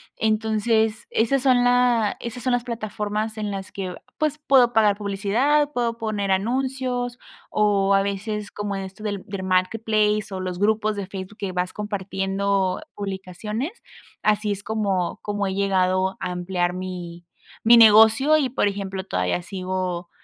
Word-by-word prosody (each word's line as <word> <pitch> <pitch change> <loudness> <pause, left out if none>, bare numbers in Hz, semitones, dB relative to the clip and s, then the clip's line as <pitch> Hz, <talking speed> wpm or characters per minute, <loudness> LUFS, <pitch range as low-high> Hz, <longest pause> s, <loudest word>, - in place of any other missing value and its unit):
Entonces, 220 0 +1
esas 250 +4 +1
son 255 -2 +4
la 245 -3 +3
esas 235 +1 -6
son 255 - +1
las 245 -1 +1
plataformas, 215 -1 -3
en 210 -1 -2
las 195 -1 -6
que, 185 -2 -5 0.2
pues, 305 -1 0
puedo 265 -5 +4
pagar 210 -3 +4
publicidad, 225 +9 +1
puedo 235 -2 -1
poner 210 -3 -2
anuncios, 245 +3 -1 0.3
o 200 -2 +2
a 195 - +4
veces 205 +1 -3
como 205 -1 -4
esto 195 +2 -7
del 205 -3 -3
del 200 -2 -5
marketplace, 210 +3 +1
o 190 - -4
los 180 -1 -4
grupos 215 +1 +1
de 200 -2 -4
Facebook 195 +1 -8
que 195 -2 -3
vas 180 0 -2
compartiendo 195 0 -1
publicaciones. 205 - -5 0.4
Así 210 0 +1
es 200 0 -3
como 200 -5 -1
como 205 -1 -2
he 190 - -2
llegado 190 -1 +1
a 180 - -3
ampliar 180 0 -1
mi 180 -2 -7 0.4
mi 235 +1 +8
negocio. 225 +7 +7
Y, 275 -4 +1
por 240 - +1
ejemplo, 195 -1 -4
todavía 90 - -1
sigo 185 -2 -4
205 Hz, 150 wpm, -23 LUFS, 190-225 Hz, 0.4 s, mi